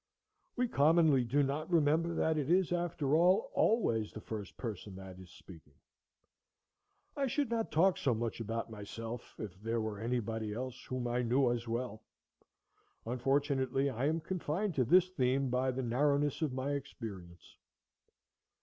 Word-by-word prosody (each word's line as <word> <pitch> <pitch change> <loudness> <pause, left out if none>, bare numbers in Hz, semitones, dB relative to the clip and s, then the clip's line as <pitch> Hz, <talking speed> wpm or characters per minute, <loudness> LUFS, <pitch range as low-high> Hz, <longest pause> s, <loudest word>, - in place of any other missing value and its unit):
We 250 0 +1
commonly 155 - +4
do 140 +5 +2
not 145 +4 -2
remember 165 +1 +3
that 160 -1 +1
it 150 -2 -1
is, 180 0 +3
after 170 -5 -1
all, 180 +4 +4
always 115 - +2
the - - -8
first 105 -5 -7
person 105 -4 -6
that 95 -1 -10
is 90 -1 -12
speaking. 80 -6 -15 1.4
I 275 -1 0
should 270 0 -1
not 225 -1 -1
talk 180 +4 +3
so 125 -4 +1
much 115 +1 -3
about 115 +1 -3
myself 115 +3 -7
if 95 -3 -7
there 115 +1 -1
were 110 -2 -3
anybody 110 -2 -2
else 130 +1 -5
whom 130 -1 -3
I 120 +1 0
knew 125 +1 +2
as 120 -1 -3
well. 115 -2 -3 1.0
Unfortunately, 135 +2 +1
I 130 +3 -1
am 160 +2 0
confined 185 +3 -2
to 130 -4 +1
this 180 +8 +5
theme 135 -5 +1
by 130 +1 +1
the 130 +1 -2
narrowness 145 +4 +1
of 155 -4 +1
my 130 +2 -2
experience. 105 -11 -7
130 Hz, 155 wpm, -33 LUFS, 115-155 Hz, 1.4 s, this